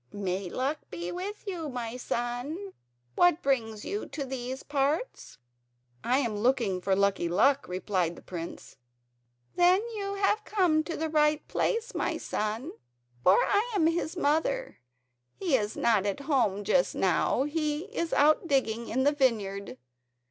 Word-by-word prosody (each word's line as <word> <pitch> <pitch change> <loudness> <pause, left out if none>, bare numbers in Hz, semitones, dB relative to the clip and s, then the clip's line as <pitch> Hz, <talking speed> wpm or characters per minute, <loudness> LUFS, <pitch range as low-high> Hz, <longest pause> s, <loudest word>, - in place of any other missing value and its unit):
"May 190 -2 -3
Luck 275 - -1
be 175 0 -5
with 390 +4 -5
you, 345 -6 -4
my 245 -2 -4
son. 250 +11 -3 0.4
What 355 -1 +3
brings 225 -6 0
you 410 +1 -2
into 280 - -5
these 260 0 -5
parts?" 290 - -2 0.7
"I 250 +2 +2
am 235 -6 0
looking 220 -4 +1
for 190 +1 +1
Lucky 195 -3 +1
Luck," 270 +11 +3
replied 180 -2 -1
the - - -14
prince. 170 -2 -8 0.8
"Then 360 +2 +5
you 400 -2 -3
have 410 +2 +1
come 355 -8 +2
to 335 - -4
the 320 - -1
right 300 -1 +2
place, 465 +2 -1
my - - -1
son, 220 +9 -3 0.5
for 185 +2 +6
I 420 +4 +1
am 345 -6 +3
his 330 +1 0
mother. 375 +12 0 0.6
He 345 -8 +1
is 210 -3 -1
not 210 -4 +2
at 200 +7 -2
home 240 -9 +1
just - - +2
now, - - +2
he 300 0 -1
is 335 -5 -1
out 305 +4 +4
digging 235 -5 0
in 260 +3 +1
the 290 - +4
vineyard. 200 - 0
275 Hz, 150 wpm, -29 LUFS, 215-335 Hz, 0.8 s, for